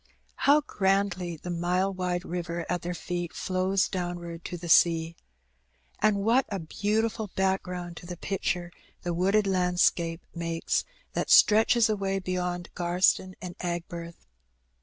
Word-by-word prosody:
How 295 +2 +7
grandly 190 - 0
the 175 +3 -6
mile 180 +3 0
wide 180 -1 -2
river 170 -1 -4
at 180 -1 -1
their 175 +1 -4
feet 175 0 -4
flows 185 +1 0
downward 175 -2 -5
to 175 - -4
the 170 0 -8
sea! 165 0 +4 0.8
And 215 -1 +3
what 240 +5 +3
a 200 - -2
beautiful 210 +5 -1
background 180 -2 -1
to 175 - -10
the 175 -1 -6
picture 180 -2 -2 0.3
the 175 - -1
wooded 195 +5 +2
landscape 180 -2 +1
makes 165 -1 -1 0.3
that - - -2
stretches 225 +2 +6
away 195 -3 -1
beyond 180 -2 -3
Gftrston 180 +1 +1
and 180 -1 -6
Aigburth 170 -1 -5
180 Hz, 135 wpm, -28 LUFS, 175-195 Hz, 0.8 s, How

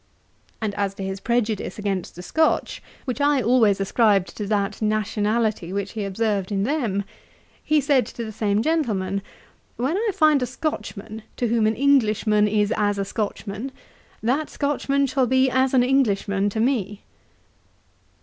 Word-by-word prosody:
And 215 -2 -1
as 200 -1 -2
to 195 - -6
his 190 0 -4
prejudice 230 -2 -1
against 200 -3 -3
the 180 - -9
Scotch, 315 - 0 0.2
which 260 +1 -3
I 290 -1 +3
always 225 -4 +3
ascribed 195 -1 +2
to 210 - -4
that 205 0 -1
nationality 215 -2 0
which 200 0 -3
he 215 -3 -4
observed 200 -1 -1
in 195 -1 0
them, 230 -7 0 0.6
he 305 0 +3
said 280 -2 +2
to 235 - -6
the 220 - -6
same 210 0 0
gentleman, 210 - 0 0.6
'When 265 +8 0
I 445 +1 0
find 310 -6 +3
a 250 - 0
Scotchman, 225 -6 -5 0.2
to 240 - 0
whom 225 -1 +2
an 220 - +1
Englishman 215 -6 +3
is 210 0 +1
as 205 -1 +1
a 200 - -1
Scotchman, 210 +3 -4 0.5
that 270 +7 0
Scotchman 280 -1 0
shall 260 -1 +1
be 260 +1 +3
as 260 0 +2
an 250 - +5
Englishman 205 -6 +1
to 220 - -4
me.' 215 -5 0
220 Hz, 160 wpm, -23 LUFS, 200-260 Hz, 0.6 s, an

